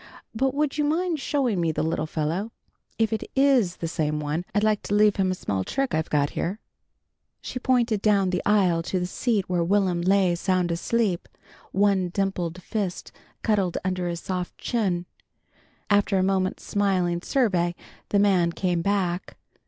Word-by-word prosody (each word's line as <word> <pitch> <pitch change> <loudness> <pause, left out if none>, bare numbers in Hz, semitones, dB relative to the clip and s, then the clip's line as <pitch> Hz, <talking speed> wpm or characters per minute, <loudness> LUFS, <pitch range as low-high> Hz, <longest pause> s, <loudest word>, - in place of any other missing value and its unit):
"But 265 +4 0
would 300 0 0
you - - +3
mind 325 +2 0
showing 255 -10 0
me 165 -1 +1
the 155 - -2
little 160 -1 -1
fellow? 165 +8 -2 0.5
If 225 -1 +1
it 220 - -2
is 265 -10 +3
the 165 - -4
same 150 -2 -1
one, 150 +4 -2
I'd 205 - +2
like 215 -1 +2
to 205 - 0
leave 210 -1 +4
him 190 -1 +2
a 185 - 0
small 95 - -2
trick 270 - -2
I've 160 0 0
got 145 -1 +1
here." 190 +6 -3 0.8
She 250 - -6
pointed 240 -5 +1
down 200 -3 +3
the 180 - 0
aisle 190 -5 +3
to 185 +2 -2
the 180 - -1
seat 205 +2 -1
where 175 -2 +1
Will'm 185 -1 +1
lay 190 0 +3
sound 180 0 0
asleep, 190 +1 0 0.4
one 195 -2 +2
dimpled 180 -2 -2
fist 200 -5 -3 0.3
cuddled 200 -6 +1
under 185 -1 -1
his 170 -1 -4
soft 180 -2 -4
chin. 190 -7 -1 0.8
After 205 -1 +3
a 185 - +2
moment's 190 -1 0
smiling 185 -4 0
survey 185 -9 +1 0.3
the 205 - +2
man 185 -4 +3
came 175 -2 0
back. 185 -2 -1
190 Hz, 170 wpm, -25 LUFS, 175-210 Hz, 0.8 s, leave